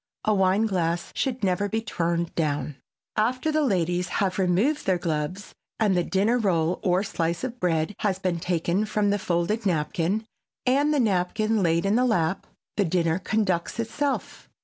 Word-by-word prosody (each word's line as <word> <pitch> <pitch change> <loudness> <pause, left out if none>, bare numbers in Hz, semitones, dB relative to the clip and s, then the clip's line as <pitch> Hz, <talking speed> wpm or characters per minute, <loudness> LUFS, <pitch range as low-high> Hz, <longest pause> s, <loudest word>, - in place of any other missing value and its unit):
A 215 - +3
wine 195 +2 +3
glass 170 -4 -1
should 255 -3 -2
never 200 +2 +1
be 220 - 0
turned 170 -6 -2
down. 150 -3 -1 0.4
After 255 +8 +1
the 310 0 +2
ladies 180 - +1
have 190 0 -1
removed 195 - +1
their 185 -2 +3
gloves 170 +3 -3 0.3
and 210 -4 +3
the 175 - +2
dinner 210 +7 +1
roll 175 -5 +1
or 185 +1 +2
slice 170 -2 -2
of 250 -1 -4
bread 165 +1 0
has 195 -3 0
been 185 -3 -1
taken 175 +3 0
from 210 -1 +1
the 205 - +1
folded 180 +6 0
napkin 180 +3 0 0.4
and 280 +4 +3
the 295 - +2
napkin 215 +1 +1
laid 170 0 +2
in 200 +3 +3
the 250 - +3
lap, 185 -6 0 0.3
the 205 - +4
dinner 165 0 +1
conducts 190 -1 -1
itself. 275 +5 -3
190 Hz, 170 wpm, -25 LUFS, 170-220 Hz, 0.4 s, the